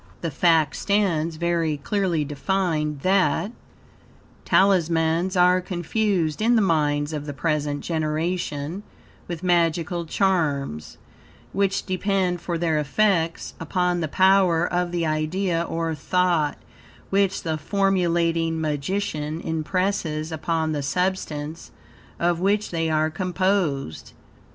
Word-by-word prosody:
The 165 - -2
fact 160 0 +3
stands 170 -6 +1
very 165 -2 0
clearly 170 0 -1
defined 150 -1 -1
that, 195 +3 +2 0.9
Talismans 170 -1 +2
are 180 +1 +5
confused 180 -1 -1
in 235 +2 +4
the 225 - +4
minds 150 -3 +1
of 150 -1 -4
the 145 - -5
present 150 -2 -1
generation 160 +1 -2 0.5
with 170 0 -6
magical 170 -1 +1
charms, 150 - -1 0.6
which 195 -1 0
depend 185 -2 0
for 170 0 -2
their 160 -2 +1
effects, 165 +2 0
upon 180 +2 0
the 160 - -1
power 185 0 +4
of 175 0 -1
the 170 -1 -1
idea 165 +3 0
or 165 -1 -2
thought, 170 -1 +1 0.5
which 195 -1 +1
the 160 -2 -2
formulating 170 -3 +1
magician 155 +1 -2
impresses 160 -1 -1
upon 160 0 -1
the 150 -2 -2
substance 160 -1 -2 0.5
of 170 0 +1
which 205 +3 +1
they 165 -1 -1
are 155 0 +1
composed. 180 - -1
170 Hz, 110 wpm, -24 LUFS, 155-185 Hz, 0.9 s, are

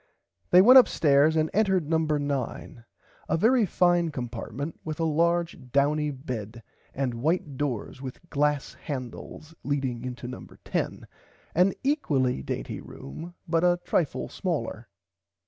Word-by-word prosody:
They 180 +1 +7
went 255 +4 +10
upstairs 150 - +4
and 155 0 +1
entered 190 -6 +2
number 160 -1 +1
9 140 -4 -4 0.4
a - - +2
very 225 +3 +4
fine 175 -1 +3
compartment 135 +2 -5
with 155 -1 -5
a - - +1
large 170 +2 +1
douny 150 +2 +2
bed 120 -5 -6 0.3
and 135 -2 -1
white 155 -1 0
doors 130 -2 -3
with 135 +5 -8
glass 150 -1 0
handles 140 +3 -7
leading 135 -4 -2
into 125 -1 -6
number 125 - -9
10 - - -2 0.5
an 180 +3 +4
equally 145 - +1
dainty - - -4
room 165 - -9
but 165 0 +1
a 175 0 +3
trifle 160 -6 0
smaller. - - -3
150 Hz, 130 wpm, -27 LUFS, 130-170 Hz, 0.5 s, went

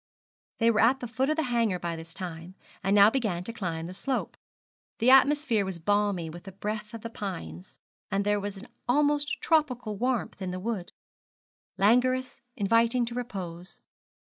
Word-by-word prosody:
They 230 0 +4
were 220 - +1
at 255 +4 +4
the 245 - -5
foot 260 +4 0
of 310 - +2
the 320 - +2
hanger 235 -7 +1
by 170 -1 -3
this 165 0 -9
time, 175 -1 -7 0.3
and 195 +1 +2
now 205 +1 +8
began 215 -10 -1
to 230 - -3
climb 165 -7 -3
the 180 - -7
slope. 260 +7 -2 0.6
The 245 +2 +4
atmosphere 270 -4 +5
was 190 -2 -4
balmy 205 -1 +1
with 170 +3 -9
the 195 - -8
breath 210 +2 -4
of 225 - -8
the 230 - -5
pines, 85 - -7 0.3
and 200 +1 0
there 205 0 +2
was 200 0 -5
an 210 +6 -10 0.2
almost 290 +2 +2
tropical 250 -9 +1
warmth 245 -2 -1
in 185 - -2
the 180 0 -4
wood 205 -3 -3 0.9
languorous, 255 +5 +2
inviting 230 +2 +3
to 235 - -6
repose. 190 -8 -6
210 Hz, 175 wpm, -28 LUFS, 185-245 Hz, 0.9 s, now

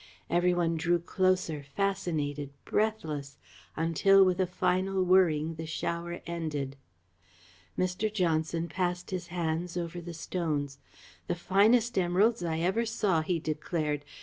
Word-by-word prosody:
Every 175 +1 +3
one 170 -2 +1
drew 175 +2 +2
closer, 180 -3 0
fascinated, 150 -3 -2 0.2
breathless, 155 -11 -1 0.4
until 190 +5 +5
with 185 -1 +1
a 185 - +1
final 185 +1 +1
whirring 165 -4 +3
the 160 0 -5
shower 170 +1 -3
ended. 150 -5 -3 1.0
Mr. 185 +4 0
Johnson 165 -4 0
passed 180 0 -2
his 180 -2 -3
hands 170 0 -2
over 175 0 -4
the 170 0 -7
stones. 150 -5 -2 0.5
"The - - 0
finest 215 +6 +3
emeralds 190 +5 +2
I 165 -1 -1
ever 190 +7 +1
saw," 210 -7 +1
he 170 +2 0
declared. 155 -1 -2
175 Hz, 125 wpm, -29 LUFS, 160-185 Hz, 1.0 s, until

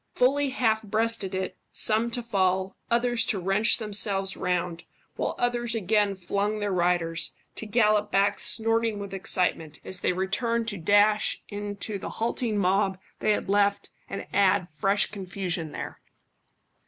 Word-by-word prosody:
Fully 275 +3 +3
half 225 -5 +1
breasted 220 -2 -1
it, 190 0 -4
some 220 +2 +1
to 240 +1 -3
fall, 190 -4 0
others 240 0 +2
to 200 - 0
wrench 195 +5 +3
themselves 200 -3 0
round, 175 -1 -2 0.3
while - - -2
others 240 -1 0
again 205 -1 +1
flung 200 +3 -2
their 205 -1 -2
riders, 175 -2 0 0.2
to 220 - -6
gallop 210 -1 +2
back 195 +1 +2
snorting 225 -1 +2
with 200 -1 -7
excitement, 180 -4 0
as 185 - -4
they - - +1
returned 225 +5 -1
to 205 - -4
dash 205 +4 +3
into 205 0 -5
the - - -6
halting 230 -1 -2
mob 190 0 +1 0.2
they - - 0
had 210 - +1
left 200 0 +1 0.2
and 195 - -5
add 195 -2 +3
fresh 195 +5 +2
confusion 180 -5 -3
there. - - -7
205 Hz, 145 wpm, -26 LUFS, 190-225 Hz, 0.3 s, Fully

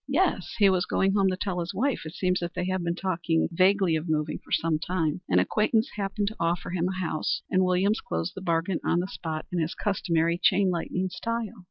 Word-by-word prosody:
"Yes. 290 - 0
He 205 -3 +6
was 185 -2 +2
going 195 0 +2
home 200 -1 +3
to 185 - -2
tell 185 -2 -2
his 175 +3 -4
wife. 255 - 0
It 160 - -9
seems 185 -1 +1
that 175 0 -5
they 180 - -1
have 185 -1 -1
been 170 0 -1
talking 170 -3 0
vaguely 185 0 +3
of 160 +1 -3
moving 155 -1 -1
for - - -20
some 160 -2 +1
time. 165 -1 -1
An 90 - +3
acquaintance 220 - +2
happened 200 0 -1
to 220 - -10
offer 170 +1 -1
him 180 -1 0
a 185 0 -3
house, 160 -4 -1
and 185 -1 +4
Williams 185 +4 +2
closed 80 0 -3
the 190 - -6
bargain 170 0 0
on 175 - +2
the 180 - -2
spot 160 -4 -5
in 180 - -1
his 160 +1 -1
customary 170 -4 0
chain 190 0 +4
lightning 180 +2 -2
style. 230 +4 -3
180 Hz, 225 wpm, -27 LUFS, 165-195 Hz, -, He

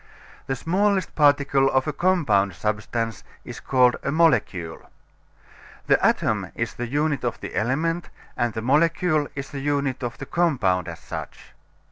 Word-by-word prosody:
The 135 - -1
smallest 190 +6 0
particle 140 -2 +3
of 130 0 +1
a 155 - -1
compound 140 - +2
substance 110 +2 -3 0.2
is - - -8
called 125 -2 +3
a 140 - -2
molecule. 110 - +1 1.0
The - - +3
atom - - +1
is - - -3
the 120 - -5
unit 145 +2 0
of 120 - -2
the - - -7
element, 160 +9 -1 0.3
and 120 -1 0
the 110 - -4
molecule 155 +3 +2
is 140 0 -6
the 140 - -5
unit 140 -1 -1
of 120 -2 -4
the 135 - -7
compound 110 - +1
as 85 -1 -6
such. - - -8
135 Hz, 150 wpm, -24 LUFS, 120-155 Hz, 1.0 s, particle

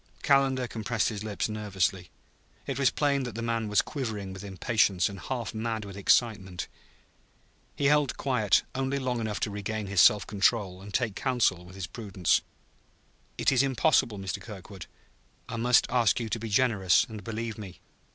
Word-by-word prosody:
Calendar 135 -3 +3
compressed 110 0 -1
his 105 -2 -5
lips 105 -2 -2
nervously. 95 -4 -2 0.6
It 135 -1 -3
was 135 - +4
plain 140 -2 +1
that 120 -4 -5
the 115 - -4
man 115 -1 -1
was 105 -1 +3
quivering 110 -9 -4
with 95 - -9
impatience 100 -1 +1
and 100 -1 -8
half 120 +2 -4
mad 110 -1 -3
with 100 -1 -9
excitement. 100 -3 +1 1.1
He 140 - -2
held 145 -1 +3
quiet 110 -8 +2
only 135 +1 -1
long 125 -3 -2
enough 110 -2 -3
to 105 - -1
regain 105 +1 -4
his 95 -2 +3
self 105 -4 +6
control 100 -2 +1
and 100 +1 -10
take 115 -1 0
counsel 120 -9 +1
with 90 +1 -13
his 95 -2 -4
prudence. 95 -3 0 1.0
"It - - +2
is 130 -2 +4
impossible, 135 -4 +2
Mr. 95 -4 -4
Kirkwood. 100 -3 -10 0.6
I - - -5
must 120 +1 +4
ask 120 -3 +3
you 115 -2 -4
to 115 - -2
be 115 +1 -5
generous 105 -5 +3
and 110 -2 -9
believe 115 -1 -4
me." 95 -4 -9
110 Hz, 170 wpm, -28 LUFS, 100-125 Hz, 1.1 s, self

